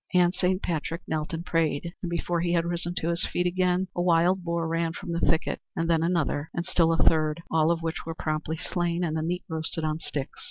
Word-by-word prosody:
And 180 0 +5
Saint 185 0 +1
Patrick 165 +1 -2
knelt 155 -1 -2
and 165 +1 -4
prayed, 165 0 0
and 175 - -3
before 170 0 -1
he 170 0 +1
had 170 -1 +2
risen 175 0 -2
to 165 - -1
his 170 0 0
feet 180 - +1
again 180 +1 +2
a 175 - 0
wild 175 +2 +3
boar 170 -1 -1
ran 165 0 0
from 180 0 -6
the 170 - 0
thicket 160 -1 +1
and 165 - 0
then 165 -1 +3
another 165 -3 0
and 170 - -1
still 165 -2 +3
a 165 - +2
third, 155 0 +3
all 160 0 +4
of 170 -1 +1
which 165 +1 -2
were 165 0 -5
promptly 155 0 -2
slain 175 +1 -1
and 160 -2 -1
the 160 - 0
meat 175 +3 -2
roasted 160 0 -3
on 155 0 -1
sticks. 140 -4 -4
170 Hz, 235 wpm, -27 LUFS, 160-175 Hz, -, And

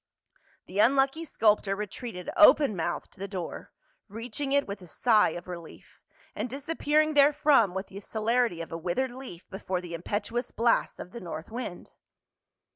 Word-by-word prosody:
The 195 - -5
unlucky 270 +7 +3
sculptor 210 -7 +2
retreated 210 -1 -6
open 300 -7 +6
mouthed 175 0 -3
to - - -19
the 195 - -4
door, 185 -3 -6 0.4
reaching 240 +6 -4
it 280 0 +3
with 200 -1 -6
a 180 - -12
sigh 215 +4 +3
of 175 - -10
relief, 170 -2 -10 0.3
and 250 - -3
disap 285 +6 -5
pearing 305 +1 +3
therefrom 285 -8 +4
with 190 +1 -2
the 195 - -10
celerity 220 -3 0
of 165 - -8
a 165 - -3
withered 185 +10 -1
leaf 245 -9 -10
before 190 -1 -3
the 175 -1 -8
impetuous 205 +8 -3
blasts 230 0 +1
of 180 - -9
the 235 - -8
north 165 +1 -7
wind. 230 -7 -6
215 Hz, 165 wpm, -28 LUFS, 185-265 Hz, 0.4 s, open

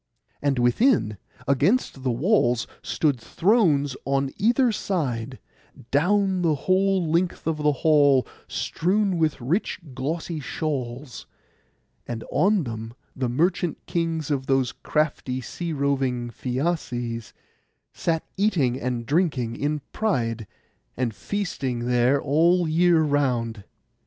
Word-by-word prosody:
And 140 -2 +1
within, 120 - +2 0.3
against 145 - +2
the 130 - -1
walls, 125 - +2 0.2
stood 145 -6 0
thrones 160 - +2
on 135 0 0
either 235 +4 +3
side, 135 - -2 0.5
down 190 +5 +2
the 165 -3 +2
whole 190 -1 +2
length 170 +2 0
of 160 -1 0
the 150 0 +2
hall, 145 -3 +4 0.2
strewn 190 +1 0
with 155 -3 +1
rich 150 - -1
glossy 155 +5 -3
shawls; 135 -3 -4 0.8
and 115 -1 -4
on 200 -1 +3
them 115 -2 -6 0.2
the 130 -2 -1
merchant 170 +5 +1
kings 165 -3 -2
of 135 -2 -1
those 135 -2 +2
crafty 145 -4 -1
sea 170 +6 -5
roving 135 -4 0
Phæaces 120 -4 -3 0.6
sat 165 -2 -1
eating 150 - +1
and 120 -1 -2
drinking 140 -6 0
in 150 +2 -1
pride, 115 - -1 0.5
and 120 -3 -1
feasting 135 - -3
there 125 +3 +3
all 170 +6 +3
the 155 - -2
year 170 0 +4
round. 125 -8 0
145 Hz, 115 wpm, -24 LUFS, 125-175 Hz, 0.8 s, hall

